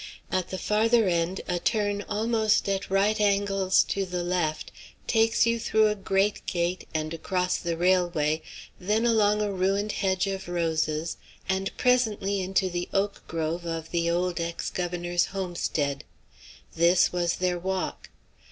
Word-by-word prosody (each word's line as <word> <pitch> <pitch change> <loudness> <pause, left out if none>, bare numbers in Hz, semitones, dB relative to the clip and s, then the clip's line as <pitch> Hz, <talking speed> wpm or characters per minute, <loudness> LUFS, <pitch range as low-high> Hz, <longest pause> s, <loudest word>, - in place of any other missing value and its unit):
At 185 -1 -1
the 190 - -4
farther 220 +2 +2
end 175 +1 0
a 180 -1 -1
turn 205 0 0
almost 220 0 +1
at 195 0 -1
right 205 +3 +2
angles 195 -2 +3
to 200 - 0
the 180 -1 -3
left 175 -3 -1 0.3
takes 225 0 +3
you 230 0 +1
through 220 -1 +3
a - - +1
great 195 +1 0
gate 175 +1 -1
and 155 0 -2
across 180 +2 -1
the 170 -1 -3
railway, 175 -4 +2 0.4
then 210 +5 +1
along 210 -2 +3
a 205 - -1
ruined 195 +3 0
hedge 190 -2 0
of 195 -1 -4
roses, 160 -2 -1 0.3
and 190 0 0
presently 215 -6 +1
into 190 +1 +1
the 175 -1 -3
oak 200 +1 -1
grove 165 +1 -2
of 165 -1 -4
the 170 -1 +1
old 175 +1 0
ex 170 0 -3
governor's 175 -1 -1
homestead. 170 -7 -2 0.7
This 170 +2 +4
was 175 -1 0
their 180 -1 -1
walk. 190 +1 -3
185 Hz, 150 wpm, -27 LUFS, 175-205 Hz, 0.7 s, This